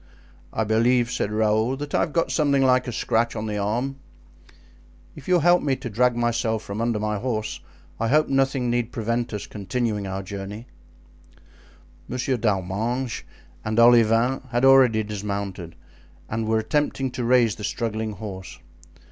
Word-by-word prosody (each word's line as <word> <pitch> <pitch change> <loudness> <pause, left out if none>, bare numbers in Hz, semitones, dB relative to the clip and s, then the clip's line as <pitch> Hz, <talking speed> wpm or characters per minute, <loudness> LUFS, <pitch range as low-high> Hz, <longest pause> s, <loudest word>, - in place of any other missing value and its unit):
"I 110 - -1
believe," 115 +3 +2
said 105 -4 -2
Raoul, 110 +4 +1
"that 145 +1 -6
I - - +3
have - - 0
got 165 +1 0
something 140 -3 +2
like 130 -1 +3
a - - -2
scratch 115 +1 0
on 110 0 -3
the 105 -1 -3
arm. 120 +7 -1 1.2
If - - -12
you 185 - +4
will 175 - +3
help 175 +2 +5
me 140 -2 +1
to 125 -3 -7
drag 125 +3 +2
myself 115 -2 0
from 100 +3 -5
under 115 -2 0
my 105 -1 -1
horse 110 -2 -3 0.4
I 115 - 0
hope 150 +5 +3
nothing 135 -2 +1
need 120 -1 -1
prevent 115 +1 -2
us 105 -2 -4
continuing 105 0 -3
our 95 0 -4
journey." 100 +3 -7 1.4
Monsieur 125 +1 -1
d'Arminges 110 +4 -1 0.4
and 110 +1 -2
Olivain 115 +1 +5
had 120 +2 +1
already 130 -5 +6
dismounted 100 -4 -5 0.5
and 110 0 -3
were 110 0 +2
attempting 135 +3 -1
to 125 0 -4
raise 120 -2 +4
the 105 - -8
struggling 110 0 -2
horse. 95 -2 -8
115 Hz, 160 wpm, -24 LUFS, 105-125 Hz, 1.4 s, already